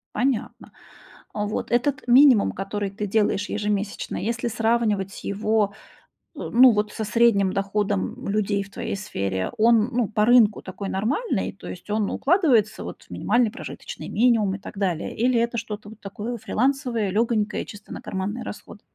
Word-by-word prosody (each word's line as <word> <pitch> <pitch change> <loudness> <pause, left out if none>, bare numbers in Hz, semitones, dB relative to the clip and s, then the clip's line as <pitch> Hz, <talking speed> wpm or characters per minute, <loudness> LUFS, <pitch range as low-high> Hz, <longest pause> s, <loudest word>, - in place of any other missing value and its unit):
Понятно. 250 0 -2 0.6
Вот 210 +2 -3
этот 260 +2 +1
минимум, 250 -3 +6
который 200 +1 -3
ты 205 +2 -5
делаешь 205 -1 +1
ежемесячно, 205 -1 -2
если 230 +3 -2
сравнивать 220 -4 0
его 215 +1 +1 0.7
т - - -8
ну, 250 +1 +6
вот, 210 0 0
со 220 - -4
средним 210 -4 +3
доходом 195 - -1
людей 200 -1 0
в 200 - -16
твоей - - -4
сфере, 95 - -3
он 230 0 +4
ну 245 -3 +1
по 210 0 +1
рынку 230 -3 +5
такой 195 +1 -6
нормальный, 250 - -1
то - - -12
есть - - -9
он 210 -1 0
укладывается, 270 - +2
вот, - - -8
в - - -22
минимальный 240 -3 +1
прожиточный - - -8
минимум 220 -4 +2
и - - -8
так - - -10
далее? 180 -5 -1
Или 240 +1 +2
это 235 +1 0
что-то 210 -1 -7
вот 220 - -13
такое 210 +4 -5
фрилансовое, 235 -2 0
лёгонькое, 215 0 0
чисто 205 0 -11
на - - -7
карманные 200 +5 -4
расходы? - - -9
215 Hz, 160 wpm, -24 LUFS, 200-235 Hz, 0.7 s, минимум